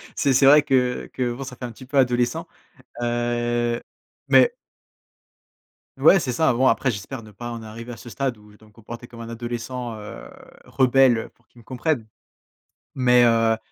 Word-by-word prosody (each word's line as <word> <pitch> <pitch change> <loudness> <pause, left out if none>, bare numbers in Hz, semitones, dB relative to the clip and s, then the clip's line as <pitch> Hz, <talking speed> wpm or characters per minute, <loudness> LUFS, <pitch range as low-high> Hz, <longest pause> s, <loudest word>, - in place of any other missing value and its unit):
C'est 140 -2 +2
c'est 135 - +4
vrai 145 +1 +7
que 125 -3 0
que, 125 -2 -1
bon 135 +3 -7
ça 130 -1 -8
fait 125 - -7
un 120 - -6
petit 130 +3 -13
peu 140 +2 -3
adolescent, 120 -2 +1 0.6
heu. 120 0 -1 0.5
Mais 475 - +5 1.5
Ouais, 195 - +6
c'est 130 - -2
ça. 125 0 +2
Bon, 130 +2 +2
après 130 - +2
j'espère 115 +4 -5
ne 110 -1 -14
pas 120 +4 -7
en 115 -1 -6
arriver 115 +2 -9
à 115 - -8
ce 120 - -11
stade 130 -2 -3
où 105 0 -19
je - - -19
dois 110 - -20
me - - -25
comporter 120 +2 -10
comme 115 - -13
un 115 - -7
adolescent, 120 0 -5
heu, 105 - -9 0.4
rebelle, 130 -2 +3
heu, 115 - -5
pour 115 - -36
qu'ils 120 - -20
me 115 - -19
comprennent. 130 -3 -2 0.9
Mais 125 -2 +4
heu, 115 -1 +3
120 Hz, 190 wpm, -23 LUFS, 115-130 Hz, 1.5 s, vrai